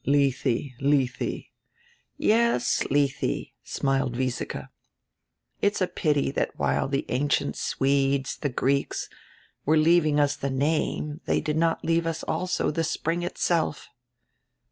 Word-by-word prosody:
"Lethe, 135 -2 +1
Lethe." 135 -3 0 0.7
"Yes, 220 - +2
Lethe," 140 -1 0
smiled 135 -3 -1
Wiesike. 130 -1 -3 0.9
"It's 205 0 +2
a 185 - +3
pity 145 -6 0
diat - - 0
while - - +1
the 135 0 -1
ancient 140 +4 0
Swedes, 135 0 +1
die 145 - -2
Greeks, 140 +2 0 0.5
were 155 +2 +3
leaving 155 -1 +4
us 145 0 +2
die 140 - -2
name 150 +2 -1
they - - +2
did 150 - -2
not 165 0 +1
leave 165 0 +2
us 165 0 -3
also 185 -3 -1
die 165 - -1
spring 165 +1 -1
itself." 170 -3 -1
145 Hz, 120 wpm, -26 LUFS, 135-165 Hz, 0.9 s, leaving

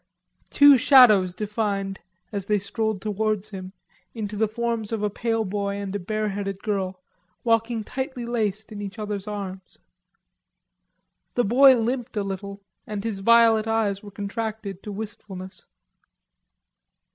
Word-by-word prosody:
Two 285 -2 +7
shadows 215 -9 +6
defined, 200 -2 -2 0.3
as 200 -2 -4
they 210 - +3
strolled 205 0 -2
towards 215 0 -1
him, 185 -1 -7 0.4
into 210 -2 -4
the 220 +1 +2
forms 230 0 -2
of 220 -2 -2
a 210 - 0
pale 225 +1 -1
boy 200 +1 -2
and 200 -1 -4
a - - -1
bareheaded 200 0 -3
girl, 190 -3 -2 0.4
walking 230 -1 +1
tightly 260 +1 -4
laced 220 -3 -2
in 205 -1 -6
each 200 +1 -6
other's 210 -2 -4
arms. 195 -2 -6 1.6
The 245 - +3
boy 260 +4 +6
limped 240 0 -2
a 205 - +1
little 200 +1 -6 0.2
and 210 -1 -4
his 220 -4 -3
violet 225 +1 +5
eyes 215 -3 0
were 210 - -10
contracted 205 -1 -5
to 210 - -7
wistfulness. 195 -3 -8
210 Hz, 135 wpm, -24 LUFS, 200-225 Hz, 1.6 s, Two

